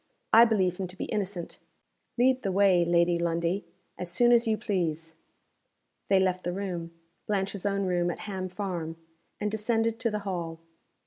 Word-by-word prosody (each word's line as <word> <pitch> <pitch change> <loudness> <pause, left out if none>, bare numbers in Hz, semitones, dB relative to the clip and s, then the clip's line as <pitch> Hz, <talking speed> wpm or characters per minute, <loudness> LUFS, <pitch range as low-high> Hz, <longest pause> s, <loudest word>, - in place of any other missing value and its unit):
I 230 +2 +9
believe 190 -6 +1
him 190 - -2
to 180 +1 -9
be - - -3
innocent. 195 -4 -3 0.6
Lead 255 +1 +3
the 195 - -1
way, 190 -2 +4
Lady 170 0 +3
Lundie, 170 +3 0 0.3
as 180 - -3
soon 240 +6 +4
as 235 0 +4
you 220 -1 +2
please." 165 -7 -2 0.9
They 195 -1 +4
left 185 -1 +1
the 175 - -1
room 180 -4 -4 0.4
Blanche's 200 -1 -1
own 200 0 0
room 175 -1 +1
at 175 - -5
Ham 190 -2 -4
Farm 175 -4 -4 0.4
and 210 0 -1
descended 225 +1 0
to 235 - +1
the 210 -1 -2
hall. 170 -4 -4
190 Hz, 170 wpm, -28 LUFS, 175-210 Hz, 0.9 s, I